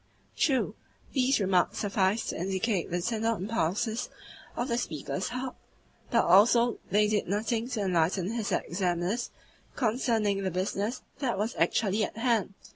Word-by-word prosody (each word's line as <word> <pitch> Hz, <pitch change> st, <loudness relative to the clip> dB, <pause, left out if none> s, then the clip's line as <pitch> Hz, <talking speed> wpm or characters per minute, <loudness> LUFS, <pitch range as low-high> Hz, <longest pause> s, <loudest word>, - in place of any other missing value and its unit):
True, 270 Hz, -4 st, +1 dB, 0.4 s
these 265 Hz, -1 st, +3 dB
remarks 185 Hz, -3 st, +2 dB
sufficed 200 Hz, +1 st, +1 dB
to -, -, -3 dB
indicate 190 Hz, +1 st, -1 dB
the 175 Hz, +1 st, -1 dB
tender 225 Hz, +1 st, 0 dB
impulses 220 Hz, +3 st, -1 dB, 0.5 s
of 240 Hz, -, -1 dB
the 235 Hz, -, 0 dB
speaker's 175 Hz, -, -3 dB
heart, 250 Hz, +1 st, -4 dB, 0.5 s
but 235 Hz, -, +3 dB
also 230 Hz, +6 st, +5 dB
they 210 Hz, +2 st, +4 dB
did 210 Hz, -1 st, 0 dB
nothing 225 Hz, +4 st, -1 dB
to 225 Hz, -5 st, -2 dB
enlighten 180 Hz, +1 st, +1 dB
his 230 Hz, -3 st, -2 dB
examiners 180 Hz, +5 st, -1 dB, 0.5 s
concerning 220 Hz, -4 st, +1 dB
the 190 Hz, -, 0 dB
business 200 Hz, +6 st, -2 dB, 0.2 s
that 245 Hz, -7 st, -1 dB
was 215 Hz, +5 st, -1 dB
actually 210 Hz, -1 st, +1 dB
at -, -, -4 dB
hand. 225 Hz, -5 st, +1 dB
210 Hz, 140 wpm, -29 LUFS, 190-235 Hz, 0.5 s, also